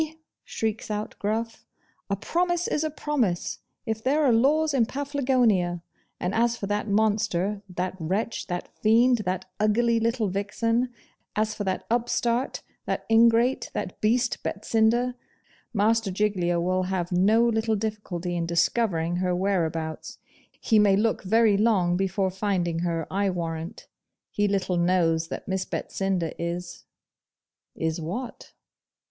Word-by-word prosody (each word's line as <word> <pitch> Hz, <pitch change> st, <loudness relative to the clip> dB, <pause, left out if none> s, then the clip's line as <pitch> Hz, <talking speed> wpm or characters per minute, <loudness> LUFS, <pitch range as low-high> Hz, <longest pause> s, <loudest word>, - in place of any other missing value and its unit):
shrieks 220 Hz, -1 st, -3 dB
out 210 Hz, 0 st, -3 dB
Gruff; 225 Hz, +2 st, -2 dB, 0.5 s
'a 200 Hz, -, +1 dB
promise 350 Hz, -, 0 dB
is 300 Hz, -, 0 dB
a 310 Hz, -, 0 dB
promise 265 Hz, -, -1 dB, 0.3 s
if 220 Hz, -1 st, -3 dB
there 290 Hz, +4 st, +2 dB
are 260 Hz, -5 st, +4 dB
laws 295 Hz, +6 st, +3 dB
in 240 Hz, -5 st, +3 dB
Paflagonia! 250 Hz, -, +1 dB, 0.4 s
And 180 Hz, +2 st, -2 dB
as 235 Hz, +1 st, +2 dB
for -, -, -4 dB
that 205 Hz, +2 st, -1 dB
monster, 205 Hz, -2 st, +1 dB
that 180 Hz, +1 st, -3 dB
wretch, 195 Hz, +8 st, -2 dB
that 175 Hz, -1 st, -4 dB
fiend, 235 Hz, +3 st, +4 dB
that 185 Hz, 0 st, -2 dB
ugly 230 Hz, +2 st, +3 dB
little 230 Hz, -1 st, 0 dB
vixen 230 Hz, +5 st, 0 dB, 0.5 s
as 215 Hz, 0 st, 0 dB
for 205 Hz, -, -4 dB
that 190 Hz, -1 st, -2 dB
upstart, 240 Hz, +1 st, 0 dB, 0.2 s
that -, -, -2 dB
ingrate, 230 Hz, +3 st, +4 dB
that 180 Hz, -, -4 dB
beast, 235 Hz, +3 st, +1 dB
Betsinda, 225 Hz, +4 st, +1 dB, 0.6 s
Master 225 Hz, 0 st, +2 dB
Giglio 185 Hz, -3 st, 0 dB
will 185 Hz, +2 st, +1 dB
have 180 Hz, -2 st, -2 dB
no 210 Hz, +6 st, +4 dB
little 220 Hz, -1 st, +1 dB
difficulty 200 Hz, -5 st, -3 dB
in 170 Hz, -1 st, -1 dB
discovering 170 Hz, -1 st, +1 dB
her 180 Hz, 0 st, 0 dB
whereabouts. 165 Hz, -4 st, -2 dB, 0.4 s
He 220 Hz, -2 st, +3 dB
may 205 Hz, -2 st, +5 dB
look 220 Hz, +2 st, +1 dB
very 215 Hz, +1 st, +4 dB
long 195 Hz, -5 st, +3 dB
before 190 Hz, 0 st, 0 dB
finding 185 Hz, -4 st, -1 dB
HER, 170 Hz, -1 st, -1 dB
I 200 Hz, +1 st, +1 dB
warrant. 170 Hz, +2 st, -5 dB, 0.4 s
He 205 Hz, 0 st, +1 dB
little 190 Hz, -2 st, 0 dB
knows 170 Hz, -2 st, +2 dB
that -, -, -7 dB
Miss 190 Hz, -1 st, -1 dB
Betsinda 190 Hz, -5 st, -2 dB
is 170 Hz, +1 st, -5 dB, 0.4 s
' -, -, -66 dB, 0.3 s
Is 160 Hz, +1 st, -2 dB
what? 230 Hz, +10 st, -6 dB
205 Hz, 140 wpm, -26 LUFS, 180-230 Hz, 0.6 s, may